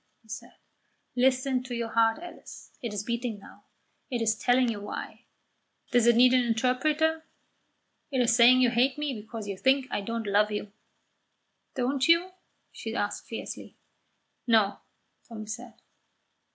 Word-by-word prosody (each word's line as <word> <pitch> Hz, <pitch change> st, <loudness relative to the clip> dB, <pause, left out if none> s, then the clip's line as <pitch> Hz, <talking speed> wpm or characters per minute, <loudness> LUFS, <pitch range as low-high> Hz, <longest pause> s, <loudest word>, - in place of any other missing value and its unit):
he -, -, -25 dB
said. 220 Hz, -, -8 dB, 0.6 s
"Listen 255 Hz, +1 st, +2 dB
to 250 Hz, -1 st, -6 dB
your 235 Hz, -1 st, -3 dB
heart, 225 Hz, 0 st, +3 dB
Alice; 350 Hz, +2 st, -11 dB
it 235 Hz, -4 st, -4 dB
is 210 Hz, 0 st, -3 dB
beating 235 Hz, -1 st, -3 dB
now. 200 Hz, -, -16 dB, 0.4 s
It 245 Hz, -, -2 dB
is 220 Hz, -1 st, +2 dB
telling 245 Hz, +2 st, +2 dB
you 220 Hz, -3 st, -3 dB
why. 205 Hz, -, -7 dB, 0.7 s
Does 245 Hz, -2 st, +4 dB
it 235 Hz, -, +6 dB
need 250 Hz, +2 st, +6 dB
an 255 Hz, -1 st, +4 dB
interpreter? 295 Hz, +7 st, +1 dB, 0.9 s
It 265 Hz, -3 st, -1 dB
is 235 Hz, -1 st, +3 dB
saying 250 Hz, +1 st, +7 dB
you 245 Hz, -2 st, +4 dB
hate 255 Hz, +3 st, +2 dB
me 295 Hz, -2 st, -2 dB
because 220 Hz, -1 st, -7 dB
you 200 Hz, -, -3 dB
think 265 Hz, 0 st, +3 dB
I -, -, -1 dB
don't 230 Hz, +2 st, -4 dB
love 205 Hz, +1 st, +3 dB
you." 210 Hz, -1 st, -4 dB, 1.0 s
"Don't 260 Hz, +1 st, 0 dB
you?" 335 Hz, +3 st, +4 dB, 0.4 s
she -, -, -6 dB
asked -, -, -3 dB
fiercely. -, -, -7 dB, 0.7 s
"No," 220 Hz, -4 st, +3 dB, 0.5 s
Tommy 220 Hz, -2 st, -7 dB
said. 230 Hz, +1 st, -8 dB
240 Hz, 150 wpm, -28 LUFS, 220-255 Hz, 1.0 s, saying